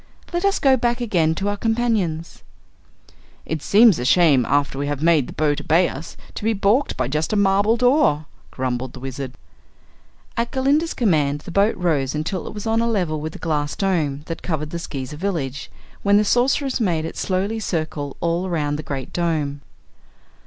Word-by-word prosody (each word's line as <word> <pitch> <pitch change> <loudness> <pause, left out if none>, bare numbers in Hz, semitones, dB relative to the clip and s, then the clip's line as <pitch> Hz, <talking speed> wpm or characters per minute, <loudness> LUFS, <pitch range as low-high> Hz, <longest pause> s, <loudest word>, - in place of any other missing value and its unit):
Let 345 +2 0
us 395 - +3
go 270 -1 +4
back 240 0 0
again 170 -9 +1
to 195 +4 -2
our 205 0 -1
companions." 220 -8 -1 1.0
"It 160 -2 -3
seems 210 - +5
a - - -2
shame, 140 -2 +4
after 140 -1 +1
we 145 - -1
have 145 0 -3
made 160 -6 +4
the - - -8
boat 145 -1 0
obey 170 +2 +3
us, 150 +5 -8 0.2
to - - -7
be 225 +1 +2
balked 215 +7 +1
by 130 - 0
just 150 +4 -1
a - - +1
marble 200 +3 +3
door," 245 - +3 0.2
grumbled 130 -1 -3
the 130 - -9
Wizard. 135 0 -6 1.0
At 235 0 -1
Glinda's 285 +5 +1
command 150 - +1
the 175 - -9
boat 200 +4 +2
rose 150 -6 0
until 165 +4 -3
it - - -7
was 210 - -6
on 225 0 +1
a 235 - +1
level 175 -9 -1
with 155 +1 -5
the - - -8
glass 150 -2 -2
dome 155 -8 0
that 165 - -6
covered 155 -3 -3
the 170 - -4
Skeezer 140 -2 -6
village, 150 -7 -3 0.3
when 200 0 +4
the 210 - +3
Sorceress 265 +4 +1
made 165 -7 0
it 165 - -6
slowly 195 +4 -1
circle 155 -7 -3
all 170 +2 0
around 150 -4 -1
the - - -4
Great 135 -3 -6
Dome. 155 -5 -1
165 Hz, 190 wpm, -21 LUFS, 145-210 Hz, 1.0 s, seems